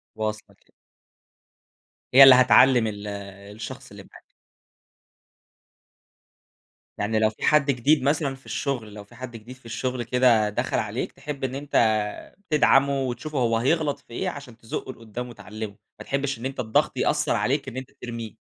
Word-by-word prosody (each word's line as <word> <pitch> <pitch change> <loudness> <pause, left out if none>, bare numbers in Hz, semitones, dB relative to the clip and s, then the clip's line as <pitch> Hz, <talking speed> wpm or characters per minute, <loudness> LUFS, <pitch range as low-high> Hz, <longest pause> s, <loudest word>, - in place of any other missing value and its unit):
واصلة 110 0 -4
كده. - - -34 1.4
هي 135 - +10
اللي 135 -1 +10
هتعلّم 125 -1 +5
ال 105 -1 -6 0.5
الشخص 110 - -8
اللي - - -11
معاك. - - -16 2.7
يعني 110 +2 0
لو 110 0 +3
في 110 - -12
حد 150 -2 +4
جديد 135 +3 +2
مثلًا 140 -1 0
في 130 - -21
الشغل، 120 -7 -3
لو 105 -1 -9
في 100 - -19
حد 130 -2 -8
جديد 115 +3 -10
في 130 - -25
الشغل 120 +2 -3
كده 120 -3 +3
دخل 105 - -2
عليك - - -3
تحب 145 -2 -8
إن 130 0 -2
أنت 145 +1 -8 0.8
تدعمه 140 -2 +3
وتشوفه 130 +4 -4
هو 115 -2 +2
هيغلط 145 +4 0
في - - -32
إيه 185 - -2
عشان 140 -8 -10
تزُقه 115 +3 -6
لقدام 115 +2 -8
وتعلمه، 110 -2 -8 0.2
ما - - -9
تحبش 140 -2 -2
إن 120 - -7
أنت 135 0 -5
الضغط 110 -3 +1
يأثّر - - +1
عليك 140 +2 0
إن 130 -1 -7
أنت 130 - -7
ترميه. 115 -3 -6
125 Hz, 160 wpm, -24 LUFS, 110-135 Hz, 2.7 s, هي